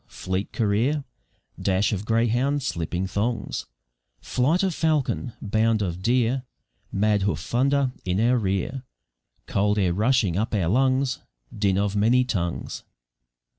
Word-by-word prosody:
fleet 95 +2 -4
career, 120 +7 +1 0.6
Dash 100 +2 +1
of 100 +1 -3
greyhound 120 +5 +1
slipping 85 - -2
thongs, 110 +5 -2 0.5
Flight 155 +10 +1
of 190 -2 +1
falcon, 150 -6 0
bound 110 +1 +2
of 90 -1 -3
deer, 120 +4 +2 0.5
Mad 105 0 +2
hoof 95 -6 0
thunder 135 +7 +1
in 90 +1 -1
our 120 +2 +3
rear, 100 +6 -1 0.6
Cold 105 +1 +1
air 90 -4 +2
rushing 110 -2 +2
up 110 +2 -1
our 90 -5 +1
lungs, 130 +3 +2 0.4
Din 100 -2 +1
of 100 0 0
many 115 +5 +4
tongues. 85 -9 -3
110 Hz, 130 wpm, -25 LUFS, 100-130 Hz, 0.6 s, many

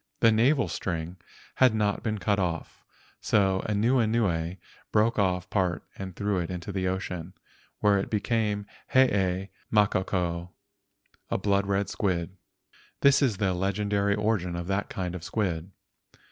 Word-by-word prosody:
The 115 - +6
navel 125 +2 +3
string 85 +1 -4 0.4
had 130 -4 +5
not 105 -2 0
been 110 -1 -1
cut 100 0 +1
off, 85 -3 -3 0.4
so 95 -2 +2
Anuenue 105 -6 +1 0.3
broke 110 +1 +3
off 90 -2 +1
part 90 -3 0
and 95 -2 -7
threw 100 -2 0
it 85 - -3
into 90 +2 -5
the 95 -1 -1
ocean, 90 -2 -4 0.5
where 100 -1 +4
it - - -3
became 105 -1 0 0.3
the 130 - +9
Hee 95 -4 0 0.2
makoko, 90 -4 +1 0.8
a - - 0
blood 100 0 +1
red 100 0 +1
squid. 90 -2 -2 0.7
This 140 +1 +5
is 120 -8 +2
the 95 -2 +1
legendary 100 +2 0
origin 105 -4 0
of 85 0 -4
that 100 +2 -1
kind 90 -2 -3
of 90 -3 -6
squid. 90 -3 -2
100 Hz, 145 wpm, -27 LUFS, 90-105 Hz, 0.8 s, the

